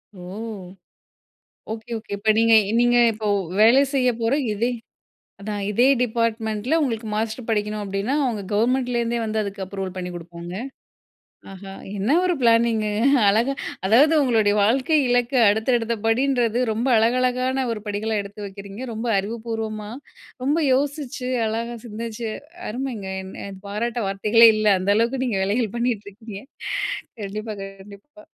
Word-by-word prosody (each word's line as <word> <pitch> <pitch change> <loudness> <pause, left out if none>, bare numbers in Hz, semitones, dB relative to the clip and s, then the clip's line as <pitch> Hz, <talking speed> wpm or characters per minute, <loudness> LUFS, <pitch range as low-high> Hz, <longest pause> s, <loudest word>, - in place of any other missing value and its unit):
ஓ! - - -12 1.5
Okay, 225 +2 -7
okay. 215 -1 -12
இப்ப 215 +2 -1
நீங்க 230 0 +4 0.3
நீங்க 240 0 +4
இப்போ 215 -1 -4 0.3
வேலை 230 +5 +7
செய்ய 255 -2 +3
போற 225 +3 +1 0.2
இதே 230 +4 0 0.7
அதான் 205 0 -4
இதே 240 +5 +3 0.2
டிபார்ட்மெண்டில 230 +2 0
உங்களுக்கு 230 -5 -2
மாஸ்டர் 220 +2 -3
படிக்கணும். 210 -1 -1
அப்டினா, 200 +6 -2
அவங்க 225 -5 -2
கவர்மெண்ட்லேருந்தே 240 +1 +1
வந்து 220 0 -2
அதுக்கு 200 -1 -5
அப்ரூவல் 190 -1 -5
பண்ணிக் 180 -1 -5
குடுப்பாங்க. 170 +1 -8 1.0
ஆஹா! 195 0 -10 0.2
என்ன 205 +6 -1
ஒரு 360 -1 +2
பிளானிங் 230 -1 +3 0.4
அழகா 230 +7 +2 0.3
அதாவது 260 +10 +5
உங்களுடைய 220 -5 +3
வாழ்க்கை 260 +9 +2
இலக்க 245 +1 +1 0.2
அடுத்த 220 +4 +2
அடுத்த 230 0 -2
படின்றது 240 -1 +2
ரொம்ப 230 +4 -2
அழகழகான 255 +3 +1
1 220 - -3
படிகள 210 +2 -2
எடுத்து 205 +1 -9
வக்கிறீங்க. 200 +3 -9
ரொம்ப 225 +2 -4
அறிவுபூர்வமா, 220 0 -4 0.5
ரொம்ப 290 +3 +2 0.2
யோசிச்சு, 275 -2 -2 0.2
அழகா 230 +2 -3
சிந்திச்சு. 230 +1 -5 0.4
அருமைங்க! 235 -4 -4 0.4
எ - - -6 0.2
பாராட்ட 230 +4 -3
வார்த்தைகளே 215 +4 +5
இல்ல! 215 0 -1
அந்த 195 +2 +2
அளவுக்கு 240 +4 +1
நீங்க 225 -6 -1
வேலைகள் 210 +2 0
பண்ணீட்டு 235 -4 -1
இருக்கீங்க. 205 0 -10 0.9
கண்டிப்பா, 215 +2 -5
கண்டிப்பா. 200 +10 -13
225 Hz, 130 wpm, -23 LUFS, 205-245 Hz, 1.5 s, வேலை